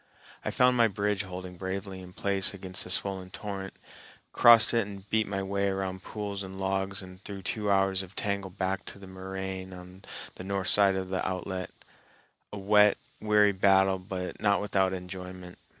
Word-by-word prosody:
I -, -, -1 dB
found 125 Hz, 0 st, +4 dB
my 120 Hz, -2 st, +5 dB
bridge 105 Hz, 0 st, -1 dB
holding 90 Hz, -2 st, -7 dB
bravely 95 Hz, +1 st, -4 dB
in 90 Hz, -1 st, -11 dB
place 100 Hz, -1 st, +2 dB
against 95 Hz, -1 st, -4 dB
the -, -, -10 dB
swollen 95 Hz, 0 st, -1 dB
torrent, 95 Hz, -1 st, -6 dB, 0.6 s
crossed 120 Hz, 0 st, +7 dB
it 115 Hz, -3 st, +2 dB
and 100 Hz, -1 st, -10 dB
beat 110 Hz, -1 st, +2 dB
my 95 Hz, -1 st, -2 dB
way 100 Hz, +1 st, 0 dB
around 95 Hz, -1 st, -3 dB
pools 100 Hz, -1 st, -5 dB
and 95 Hz, 0 st, -7 dB
logs 95 Hz, 0 st, -1 dB
and 95 Hz, +1 st, -13 dB
through 100 Hz, -2 st, -7 dB
two 105 Hz, +2 st, -2 dB
hours 95 Hz, -1 st, +2 dB
of 95 Hz, +1 st, -11 dB
tangle 100 Hz, -1 st, -2 dB
back 95 Hz, +1 st, -2 dB
to -, -, -8 dB
the 100 Hz, -, -12 dB
moraine 95 Hz, 0 st, -6 dB
on 90 Hz, +1 st, -12 dB, 0.4 s
the -, -, -7 dB
north 95 Hz, -1 st, -1 dB
side 100 Hz, -2 st, +4 dB
of 95 Hz, -1 st, -3 dB
the 95 Hz, 0 st, -1 dB
outlet,—a 95 Hz, +2 st, -8 dB
wet, 105 Hz, +1 st, +5 dB, 0.2 s
weary 105 Hz, -1 st, +4 dB
battle 95 Hz, 0 st, +4 dB
but 90 Hz, -1 st, -6 dB
not 100 Hz, -2 st, +3 dB
without 95 Hz, -2 st, +1 dB
enjoyment. 90 Hz, -1 st, -8 dB
95 Hz, 175 wpm, -29 LUFS, 95-100 Hz, 0.6 s, crossed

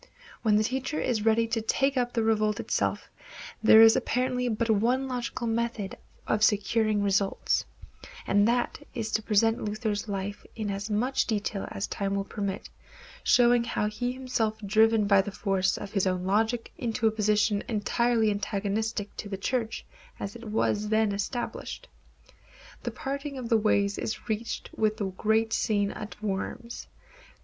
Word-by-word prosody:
When 215 Hz, -3 st, +3 dB
the 215 Hz, -, +4 dB
teacher 265 Hz, +6 st, -2 dB
is 220 Hz, -3 st, -1 dB
ready 225 Hz, +1 st, +4 dB
to 225 Hz, 0 st, -1 dB
take 270 Hz, +5 st, +1 dB
up 245 Hz, -1 st, 0 dB
the 230 Hz, -, 0 dB
revolt 215 Hz, -1 st, +1 dB
itself, -, -, -1 dB, 0.5 s
there 220 Hz, 0 st, +8 dB
is 225 Hz, 0 st, +8 dB
apparently 250 Hz, 0 st, 0 dB
but 225 Hz, +1 st, -1 dB
one 245 Hz, +6 st, +2 dB
logical 245 Hz, -1 st, -3 dB
method 230 Hz, -3 st, -2 dB, 0.3 s
of 215 Hz, 0 st, +1 dB
securing 215 Hz, 0 st, +2 dB
results, 195 Hz, 0 st, +1 dB, 0.6 s
and 205 Hz, +1 st, +3 dB
that 240 Hz, +1 st, 0 dB, 0.2 s
is 220 Hz, -1 st, -3 dB
to 220 Hz, -, +1 dB
present 225 Hz, +2 st, +2 dB
Luther's 210 Hz, 0 st, -2 dB
life 200 Hz, 0 st, -4 dB
in 215 Hz, -3 st, -3 dB
as 200 Hz, +2 st, -4 dB
much 240 Hz, +6 st, +1 dB
detail 205 Hz, -2 st, -2 dB
as 195 Hz, -, -3 dB
time 200 Hz, 0 st, -2 dB
will 200 Hz, -, 0 dB
permit, 200 Hz, -1 st, -4 dB, 0.6 s
showing 240 Hz, -1 st, +5 dB
how 230 Hz, -2 st, -1 dB
he 245 Hz, +4 st, -2 dB
felt -, -, -11 dB
himself 225 Hz, -4 st, -1 dB
driven 220 Hz, +1 st, +4 dB
by 200 Hz, -1 st, +5 dB
the 195 Hz, -, -5 dB
force 195 Hz, -2 st, 0 dB
of 195 Hz, -, -7 dB
his 195 Hz, -2 st, +1 dB
own 185 Hz, -1 st, 0 dB
logic 225 Hz, +4 st, 0 dB
into 230 Hz, -1 st, -1 dB
a 220 Hz, -, +5 dB
position 210 Hz, -1 st, +1 dB
entirely 225 Hz, 0 st, +1 dB
antagonistic 205 Hz, +1 st, -2 dB
to 205 Hz, -, -6 dB
the 195 Hz, -, -4 dB
Church 230 Hz, +2 st, -2 dB, 0.3 s
as 200 Hz, +2 st, -5 dB
it 235 Hz, 0 st, -10 dB
was 210 Hz, -1 st, 0 dB
then 220 Hz, -1 st, +2 dB
established. 205 Hz, +5 st, -4 dB, 0.9 s
The -, -, -3 dB
parting 280 Hz, +1 st, -5 dB
of 245 Hz, -3 st, -5 dB
the 230 Hz, -, +5 dB
ways 200 Hz, -2 st, +1 dB
is 220 Hz, -, -4 dB
reached 220 Hz, +1 st, -3 dB
with 215 Hz, 0 st, +1 dB
the 210 Hz, -, -2 dB
great 220 Hz, +3 st, +1 dB
scene 205 Hz, -2 st, +1 dB
at 210 Hz, 0 st, -8 dB
Worms. 215 Hz, +4 st, -4 dB
220 Hz, 165 wpm, -28 LUFS, 205-235 Hz, 0.9 s, there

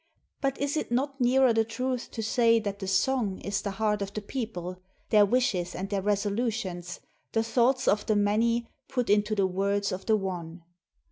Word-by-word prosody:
But 275 Hz, -2 st, 0 dB
is 285 Hz, +2 st, -1 dB
it 305 Hz, -, -3 dB
not 270 Hz, +2 st, -1 dB
nearer 255 Hz, 0 st, +4 dB
the 225 Hz, 0 st, +3 dB
truth 250 Hz, +2 st, -3 dB
to 225 Hz, -, -5 dB
say 230 Hz, +1 st, +4 dB
that 200 Hz, -2 st, -4 dB
the 195 Hz, -, -5 dB
song 200 Hz, +1 st, +1 dB
is 200 Hz, +1 st, -2 dB
the 205 Hz, -, -3 dB
heart 210 Hz, -1 st, +1 dB
of 200 Hz, 0 st, -3 dB
the 215 Hz, -, -2 dB
people, 185 Hz, -7 st, -5 dB, 0.3 s
their 210 Hz, -2 st, +6 dB
wishes 195 Hz, -7 st, 0 dB
and 195 Hz, +2 st, -5 dB
their 200 Hz, -1 st, 0 dB
resolutions, 205 Hz, -3 st, -2 dB, 0.3 s
the 225 Hz, -, +2 dB
thoughts 250 Hz, +3 st, +2 dB
of 210 Hz, 0 st, +2 dB
the 215 Hz, -, +3 dB
many 230 Hz, +3 st, +2 dB, 0.2 s
put 250 Hz, -5 st, -1 dB
into 210 Hz, +1 st, +2 dB
the 200 Hz, -2 st, +2 dB
words 200 Hz, +2 st, 0 dB
of 185 Hz, +1 st, -5 dB
the 220 Hz, -1 st, +4 dB
one? 175 Hz, -3 st, -5 dB
215 Hz, 190 wpm, -28 LUFS, 195-240 Hz, 0.3 s, their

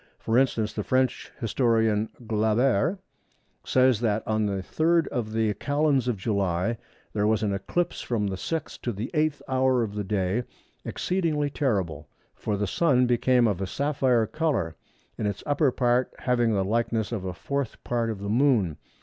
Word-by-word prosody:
For 110 Hz, -, -2 dB
instance, 115 Hz, -5 st, +1 dB
the 105 Hz, -, -3 dB
French 130 Hz, +2 st, 0 dB
historian, 110 Hz, -3 st, +1 dB, 0.2 s
Glaber, 110 Hz, -, +2 dB, 0.7 s
says 130 Hz, -3 st, +3 dB
that 110 Hz, -2 st, 0 dB
"on 110 Hz, -1 st, +1 dB
the 100 Hz, -2 st, -2 dB
3rd 165 Hz, -, +2 dB
of 115 Hz, -5 st, -3 dB
the 110 Hz, -1 st, +1 dB
Calends 140 Hz, +3 st, +1 dB
of 120 Hz, -4 st, 0 dB
July 100 Hz, +1 st, 0 dB, 0.3 s
there 105 Hz, -1 st, +1 dB
was 110 Hz, 0 st, +2 dB
an 100 Hz, -2 st, 0 dB
eclipse 135 Hz, -, -2 dB
from 115 Hz, -4 st, -1 dB
the 95 Hz, -1 st, -2 dB
sixth 155 Hz, -, -4 dB
to 120 Hz, -, -2 dB
the 105 Hz, +5 st, -5 dB
eighth 155 Hz, -2 st, 0 dB
hour 130 Hz, -2 st, +2 dB
of 105 Hz, -3 st, -4 dB
the 105 Hz, 0 st, -3 dB
day 95 Hz, +2 st, 0 dB, 0.4 s
exceedingly 160 Hz, -6 st, -1 dB
terrible. 95 Hz, -, -1 dB, 0.2 s
For 105 Hz, -, -3 dB
the 105 Hz, -, 0 dB
Sun 125 Hz, -, +3 dB
became 125 Hz, 0 st, +3 dB
of 100 Hz, -3 st, -1 dB
a 95 Hz, -, -1 dB
sapphire 130 Hz, -, +1 dB
colour; 115 Hz, -, -1 dB, 0.4 s
in 105 Hz, -, 0 dB
its 100 Hz, -1 st, -4 dB
upper 145 Hz, -1 st, +2 dB
part 125 Hz, 0 st, +1 dB
having 120 Hz, -2 st, +1 dB
the 95 Hz, -1 st, +1 dB
likeness 115 Hz, +1 st, 0 dB
of 110 Hz, -5 st, -3 dB
a 95 Hz, -1 st, -3 dB
fourth 140 Hz, +3 st, -4 dB
part 120 Hz, -1 st, -1 dB
of 105 Hz, -3 st, -4 dB
the 100 Hz, -, -4 dB
Moon." 110 Hz, -, +2 dB
115 Hz, 170 wpm, -26 LUFS, 105-130 Hz, 0.7 s, says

